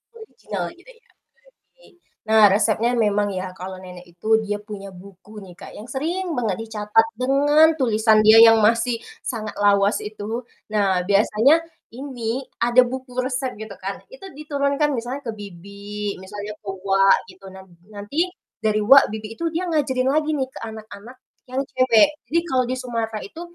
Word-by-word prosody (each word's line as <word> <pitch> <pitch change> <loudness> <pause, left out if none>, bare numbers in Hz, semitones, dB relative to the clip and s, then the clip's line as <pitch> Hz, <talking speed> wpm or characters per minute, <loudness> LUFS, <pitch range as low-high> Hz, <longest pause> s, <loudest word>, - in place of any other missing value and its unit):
Original 450 +1 -7
gitu 440 +8 -17
ya. 460 - -30 0.7
Jadi - - -22 0.4
nah 220 -1 +5
resepnya 220 +3 +2
memang 205 -2 +1
ya, 185 0 -5
kalau 185 0 -8
nenek 180 -1 -11
itu 175 +6 0
dia 205 0 -3
punya 205 -2 -9
buku 195 +3 -14
nih 180 -2 -13
Kak, - - -12
yang 220 - -10
sering 330 +7 -3
banget 220 -6 -1
dicatat 220 0 +1
dengan 285 +5 +4
tulisan 220 -3 +3
dia 220 +1 +8
yang 225 0 +6
masih 230 +1 +2 0.2
sangat 215 -4 -5
lawas 200 0 +3
itu. 215 +3 -5 0.3
Nah 195 -4 +1
biasanya 220 +10 +3 0.3
ini 255 -2 -4 0.2
ada 240 +2 +5
buku 255 +1 -6
resep 255 0 -3
gitu 220 -1 -8
kan, 195 +1 -5
itu - - -12
diturunkan, 285 0 -1
misalnya 245 +4 -5
ke 230 - -1
bibi, 200 +1 -7
misalnya 205 +2 -7
ke 210 - -19
uwa 195 0 +1 0.2
gitu. 190 +1 -18
Nan 190 0 -12 0.3
nanti 210 - -2 0.4
dari 215 -1 +1
uwa, 270 +6 +7
bibi, 220 0 -7
itu 335 - -2
dia 345 +3 -2
ngajarin 265 -4 0
lagi 310 +1 +1
nih 265 -2 -2
ke - - -10
anak-anak 220 +2 -11 0.3
yang 260 +2 -1
cewek. 255 0 +4 0.2
Jadi 335 - +1
kalau 255 -1 +2
di 255 - -2
Sumatera 230 -3 -4
itu, 320 +12 -10
220 Hz, 165 wpm, -22 LUFS, 205-260 Hz, 0.7 s, dia